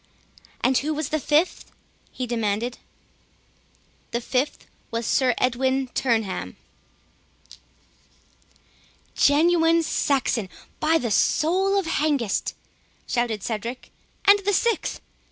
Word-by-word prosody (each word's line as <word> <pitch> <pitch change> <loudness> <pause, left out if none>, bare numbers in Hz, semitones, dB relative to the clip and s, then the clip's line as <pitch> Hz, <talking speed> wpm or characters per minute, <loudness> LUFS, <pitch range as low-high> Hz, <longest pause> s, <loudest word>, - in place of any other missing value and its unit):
"And 255 +1 +3
who 305 +2 -2
was 305 -1 -3
the 310 - 0
fifth?" 305 +5 0 0.4
he 255 - -4
demanded. 230 0 -2 1.3
"The 235 - -2
fifth 255 +4 -2 0.2
was 230 0 -3
Sir 255 -2 +2
Edwin 260 +1 0
Turneham." 225 -6 -1 2.6
"Genuine 330 +2 +4
Saxon, 260 -9 0 0.3
by 320 +1 +3
the 240 -8 -2
soul 375 - +2
of 390 - 0
Hengist!" 290 -9 0 0.5
shouted 235 -5 -1
Cedric—"And 245 - 0
the 405 +1 0
sixth?" 450 -3 0
265 Hz, 95 wpm, -24 LUFS, 235-325 Hz, 2.6 s, Genuine